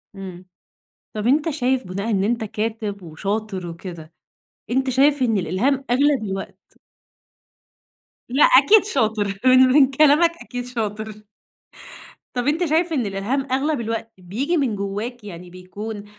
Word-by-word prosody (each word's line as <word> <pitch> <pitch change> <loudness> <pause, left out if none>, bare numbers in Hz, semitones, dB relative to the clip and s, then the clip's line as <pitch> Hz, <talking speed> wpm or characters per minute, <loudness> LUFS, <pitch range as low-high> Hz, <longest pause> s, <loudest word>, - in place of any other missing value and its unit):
إمم، 185 -2 -9 0.7
طَب 215 0 -3
أنت 295 +6 +2
شايف 260 -5 -1
بُناءً 200 +5 -4
إن 195 -2 +1
أنت 230 +1 0
كاتب 215 -2 -4
وشاطر 195 +3 -4
وكده، 170 -1 -9 0.6
أنت 260 +2 +1
شايف 275 +2 +3
إن 225 -4 +2
الإلهام 230 - 0
أغلب 275 -1 +2
الوقت 195 -1 -7 1.5
لأ، 265 +4 +3
أكيد 440 -4 +6
شاطر 215 - -1
من 255 0 +7
من 260 +1 +5
كلامك 305 +4 +5
أكيد 245 -1 -6
شاطر. 215 -3 -5 1.1
طَب 245 +1 -2
أنت 325 +4 +1
شايف 330 +2 +1
إن 260 -7 0
الإلهام 235 +8 -2
أغلب 275 0 0
الوقت 225 0 -4
بييجي 235 - -2
من 260 -8 0
جواك، 205 +4 -5
يعني 180 -3 -9
بيكون 205 +4 -8
225 Hz, 135 wpm, -21 LUFS, 200-270 Hz, 1.5 s, من